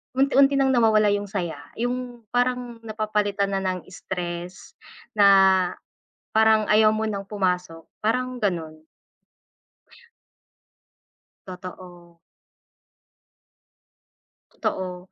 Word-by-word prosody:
unti-unti 275 +1 +4
ng 270 -1 +3
nawawala 215 -4 +4
yung 205 0 -1
saya, 180 -5 -4 0.2
yung 245 0 -4
parang 245 -1 -1
napapalitan 210 -2 -1
na 195 - 0
ng 185 -2 -3
stress, 180 0 -7 0.3
na 205 -2 +5 1.1
parang 220 -1 +4
ayaw 215 0 +5
mo 220 0 -1
ng 200 -2 -4
pumasok, 180 -5 -2 0.2
parang 250 +3 -1
ganun. 160 -6 -2 2.6
Totoo. 180 -2 -11 2.3
Totoo. 185 -1 -4
205 Hz, 85 wpm, -24 LUFS, 185-230 Hz, 2.6 s, na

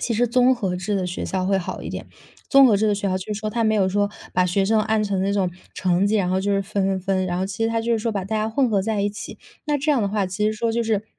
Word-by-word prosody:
其 240 - -1
实 240 +3 +2
综 250 +2 +4
合 195 -7 -2
制 190 +3 -2
的 185 -2 -1
学 180 - -4
校 185 -1 -2
会 195 0 +2
好 175 - -5
一 - - -5
点， - - -6 0.4
综 275 0 +7
合 220 -5 +4
制 215 +2 +1
的 205 - +2
学 200 0 -2
校 185 - 0
就 190 +3 -5
是 - - -2
说， 215 - -2
它 230 +1 0
没 220 0 +2
有 195 -3 +2
说 205 +1 0 0.2
把 185 - +3
学 195 +2 +1
生 220 +2 +3
按 215 0 +1
成 195 -2 -1
那 195 +1 0
种 195 -3 +1 0.2
成 185 +1 +1
绩， 215 +2 +2
然 185 -3 +1
后 185 +1 +1
就 200 +1 0
是 195 - +1
分 200 -1 -1
分 190 -1 0
分， 190 0 0
然 175 -1 -2
后 190 - -1
其 220 +4 -3
实 - - +2
它 230 0 0
就 230 0 +1
说 225 +1 -2
把 200 -3 -3
大 220 +3 -2
家 215 0 0
混 260 +2 +2
合 200 -3 +2
在 215 0 -1
一 205 - +1
起， 210 - -8 0.3
那 295 -1 +1
这 295 +3 0
样 260 -6 +1
的 200 - 0
话， 205 -1 0
其 185 +3 -2
实 215 - +1
说 225 +1 -1
就 235 +1 0
是 220 -2 0
205 Hz, 355 characters per minute, -22 LUFS, 190-220 Hz, 0.4 s, 综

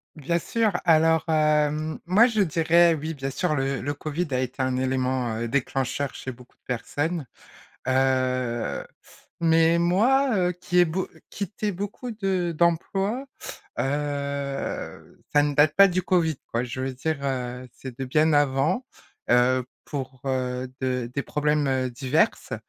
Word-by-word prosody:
Bien 170 +3 -1
sûr, 225 +3 0
alors, 160 -1 +4
hem, 155 0 +2
moi 200 +7 +5
je 220 -4 +1
dirais 170 0 +4
oui 160 +2 -4
bien 135 -2 -4
sûr, 155 +3 -1
le 135 -1 -1
le 145 +2 -2
Covid 155 +4 -3
a 130 - +1
été 130 +1 -3
un 130 -1 0
élément, 130 -2 0
heu, 115 +1 -2
déclencheur 135 +2 -1
chez 130 - -6
beaucoup 125 0 -18
de - - -56
personnes, 145 +6 -2 0.6
heu, 130 -2 0 0.5
mais, 165 0 +4
moi, 235 +9 +3
heu, 180 -1 +2
qui 180 0 -3
ai 175 - +7
beau 175 +3 -3 0.2
quitté 205 +1 -3
beaucoup 205 +6 -5
de 190 -5 -1
d'emplois, 195 - 0 0.5
heu, 140 0 -3
ça 145 - +6
ne 145 -1 0
date 150 +1 +4
pas 200 0 +8
du 185 0 -1
Covid, 170 -4 +2
quoi, 115 +1 -2
je 125 +1 -5
veux 130 0 -2
dire, 155 +5 -2
heu, 125 -1 -3
c'est 130 -2 -9
de 135 - -3
bien 155 +5 +3
avant, 145 - +2 0.5
heu, 125 +1 +4 0.2
pour, 130 -3 -6
heu 130 -1 -2
de 125 -2 -1
des 140 +2 -2
problèmes, 150 0 0
heu, 130 -1 0
diverses 135 - 0
145 Hz, 155 wpm, -25 LUFS, 130-170 Hz, 0.6 s, pas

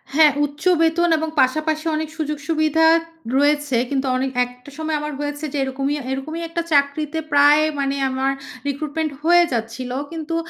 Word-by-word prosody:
হ্যাঁ। 310 -1 +7
উচ্চ 290 +2 -10 0.2
বেতন 330 +1 +3
এবং 320 +1 -2
পাশাপাশি 310 +4 0
অনেক 310 0 -3
সুযোগ 300 -1 -2
সুবিধা 320 0 +2 0.5
রয়েছে। 290 -2 +2
কিন্তু 275 -1 -1
অনেক 265 +1 -1
একটা 250 +2 -14
সময় 315 0 -2
আমার 300 0 -4
হয়েছে 290 +1 -4
যে - - -2
এরকমই 270 +2 -2 0.2
এরকমই 310 +5 -4
একটা 335 +1 -2
চাকরিতে 290 +2 +1
প্রায় 290 +1 +6 0.2
মানে 275 0 0
আমার 265 +1 0 0.4
রিক্রুটমেন্ট 305 +2 -2
হয়ে 350 +2 +6
যাচ্ছিল। 235 +2 -4 0.2
কিন্তু 330 0 -4
295 Hz, 155 wpm, -21 LUFS, 275-315 Hz, 0.5 s, হ্যাঁ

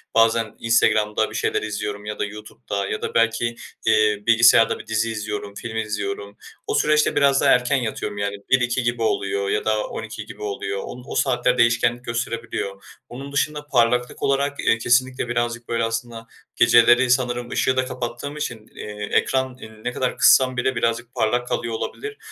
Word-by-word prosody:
Bazen 115 -1 +3
Instagram'da 110 -2 +2
bir - - -9
şeyler - - 0
izliyorum 105 -1 -4
ya 105 - -5
da - - 0
YouTube'da 105 -1 -6
ya - - -3
da - - -4
belki, 115 +1 +1 0.3
eee, 105 -1 +3
bilgisayarda 115 0 +5
bir - - -11
dizi 110 +1 0
izliyorum, 105 -2 -5
film 110 -1 -6
izliyorum. 100 -1 -4 0.3
O - - -1
süreçte 150 0 +2
biraz 140 -1 +4
daha - - +4
erken 125 +3 +3
yatıyorum 110 -3 -4
yani 100 0 -2
01.00-02.00 125 -1 +2
gibi 120 0 -1
oluyor 415 - 0
ya 430 +1 -1
da - - 0
12.00 - - -7
gibi - - -12
oluyor. 420 +2 -3
O 125 - -8
o - - -6
saatler 125 -1 +1
değişkenlik 120 +1 +2
gösterebiliyor. 115 -4 -4 0.3
Onun 135 +3 -8
dışında 150 +1 -1
parlaklık 125 -1 +1
olarak, 140 +1 0
eee, 115 - +2
kesinlikle 125 +2 +1
birazcık, 120 0 -2
böyle 115 -1 0
aslında, 115 0 -4 0.3
geceleri 120 +2 +5
sanırım 120 -1 0
ışığı 130 0 0
da 130 - +2
kapattığım 125 +3 -5
için, 120 -7 -5
eee, 105 0 -6
ekranı 130 -1 +1 0.3
ne 125 - -2
kadar 125 0 -2
kıssam 130 -1 +5
bile 130 +1 0
birazcık 115 +1 -1
parlak 120 +3 0
kalıyor 115 -1 -2
olabilir. 425 - -5
120 Hz, 170 wpm, -22 LUFS, 110-130 Hz, 0.3 s, bilgisayarda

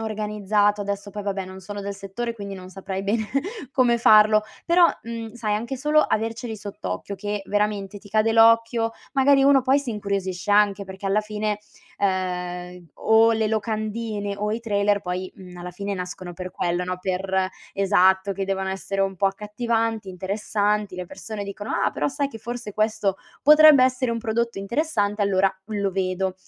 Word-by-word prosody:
organizzato 210 -1 0
adesso 200 0 -4
poi 205 +1 -6
vabbè 195 -1 -2
non 190 0 -10
sono 205 +2 -7
del 200 0 -4
settore, 200 +5 -5
quindi 200 -3 -7
non 185 -1 -10
saprei 190 0 -5
bene 215 +2 0 0.5
come 245 -2 +3
farlo. 215 -1 +6 0.2
Però, 345 +1 +6 0.2
mhmm, 230 -1 -6
sai, 220 -3 -1
anche 235 +5 -3
solo 300 +4 +3
averceli 225 -2 -1
sott'occhio 145 - -5
che 205 +1 -4
veramente 205 -1 -1
ti 205 - -16
cade 215 +2 +2
l'occhio, 230 0 +4 0.2
magari 275 0 +5
uno 275 -1 +5
poi 265 +2 +3
si 280 -4 -4
incuriosisce 200 -2 -3
anche, 205 -1 +3
perché 190 +1 -7
alla 195 +2 +2
fine, 210 0 -3 0.4
ehm, 180 -2 -2
o 225 +1 +4
le 220 -1 +1
locandine 215 -1 -2
o 210 +1 -2
i 225 - -2
trailer 205 -2 +1
poi, 185 -1 -4
uhm, 180 -1 -12
alla 175 0 -7
fine 200 +3 -4
nascono 180 -1 -6
per 185 +1 -6
quello, 175 0 -1
no? 180 0 -3
Per 190 0 -1 0.2
esatto, 190 0 +3
che 195 0 -3
devono 190 0 -2
essere 195 +1 -3
un 195 -1 0
po' 195 - +2
accattivanti, 220 +2 -1
interessanti, 205 +2 -1
le 180 0 -5
persone 215 +3 -7
dicono: 200 +1 -6
“Ah, - - +1
però 145 - -1
sai 280 - -2
che 225 - -10
forse 235 -1 -6
questo 215 -3 0 0.3
potrebbe 300 -2 +8
essere 255 -1 +1
un 230 - -1
prodotto 230 0 -1
interessante? 210 -2 0
Allora 195 -1 +3 0.2
lo 205 -2 -1
vedo.” 185 0 -1
205 Hz, 170 wpm, -24 LUFS, 190-225 Hz, 0.5 s, potrebbe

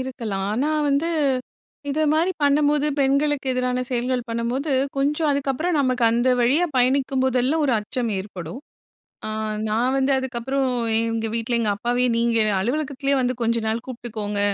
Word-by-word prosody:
இருக்கலாம். 230 -7 -4
ஆனா 270 +8 0 0.2
வந்து 285 +4 +1 0.8
இது 305 - -1
மாரி 335 +4 +2
பண்ணும்போது, 290 +1 +3
பெண்களுக்கு 280 +1 +1
எதிரான 250 0 0
செயல்கள் 250 0 0
பண்ணும்போது, 240 +6 -2 0.2
கொஞ்சம் 295 +3 +1
அதுக்கப்புறம் 280 +5 0
நமக்கு 255 -2 0
அந்த 240 +2 +2
வழியா 275 +9 +3
பயணிக்கும் 260 +1 +2
போதெல்லாம் 260 +5 +1
1 260 - +2
அச்சம் 235 +2 -3
ஏற்படும். 190 +3 -7 0.7
அ - - -3 0.4
நான் 240 +5 +1
வந்து 270 +1 +2
அதுக்கப்புறம் 265 +1 -1 0.3
எங்க 230 -1 -1
வீட்ல 230 +1 -1
எங்க 220 - 0
அப்பாவையே, 245 +4 0
நீங்க 235 -1 +2 0.2
அலுவலகத்திலயே 275 +4 -1
வந்து 250 0 0
கொஞ்ச 230 0 +1
நாள் 225 +2 -1
கூப்பிட்டுக்கோங்க. 220 -4 -4
255 Hz, 140 wpm, -23 LUFS, 235-280 Hz, 0.8 s, பண்ணும்போது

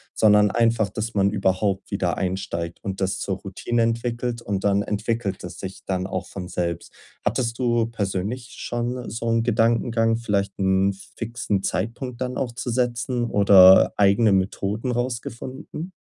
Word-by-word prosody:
sondern 105 -1 +5
einfach, 115 -3 +2
dass 110 +3 -4
man 100 -1 +3
überhaupt 95 0 0
wieder 95 -4 -1
einsteigt 90 -3 -3
und 95 -2 -4
das 95 0 0
zur 95 - -2
Routine 115 +4 -1
entwickelt. 115 +1 -2
Und 100 -4 -3
dann 100 0 +3
entwickelt 105 -1 -2
es 90 - -8
sich 95 0 -7
dann 95 -1 -2
auch 95 -1 -3
von 90 -2 -7
selbst. 85 -2 -3 0.3
Hattest 115 -2 -1
du 120 -2 +2
persönlich 105 +3 -3
schon 120 +1 -3
so 115 0 -4
'n 115 0 +2
Gedankengang, 115 0 +2
vielleicht 100 -4 -1
'n 95 0 +2 0.2
fixen 115 -4 -2
Zeitpunkt 120 +5 -3
dann 125 0 -2
auch 125 -3 -2
zu 120 +1 -4
setzen 125 0 0
oder 100 -3 +7
eigene 105 +2 +4
Methoden 100 +5 -1
rausgefunden? 130 +7 -5
110 Hz, 150 wpm, -23 LUFS, 95-120 Hz, 0.3 s, oder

